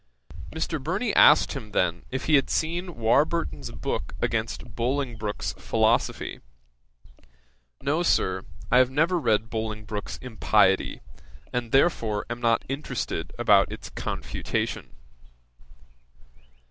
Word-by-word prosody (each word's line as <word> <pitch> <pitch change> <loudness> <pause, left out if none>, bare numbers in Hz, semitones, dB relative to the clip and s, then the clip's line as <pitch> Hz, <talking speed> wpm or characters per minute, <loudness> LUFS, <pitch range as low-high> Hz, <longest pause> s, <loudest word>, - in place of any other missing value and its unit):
1758.] 160 0 -2
Mr. - - -12
Burney 195 - -1
asked 150 - +6
him 115 -7 -7
then 85 -1 0
if 130 0 -4
he 155 - +1
had 140 -2 +4
seen 170 +2 -1
Warburton's 145 +9 +1
book - - -4
against - - -2
Bolingbroke's 120 -4 -2
Philosophy? - - +1 1.4
"No, 150 +4 +1
Sir, 95 - +2 0.3
I 125 - +6
have 130 -1 +5
never 165 +6 +2
read 110 -5 +1
Bolingbroke's 110 -2 -4
impiety, 105 -5 +2 0.5
and 120 -2 -2
therefore 115 -8 +2
am 120 0 -4
not 115 -1 +2
interested 125 - -3
about - - +4
its - - -8
confutation."' - - -3
125 Hz, 110 wpm, -26 LUFS, 110-155 Hz, 1.4 s, asked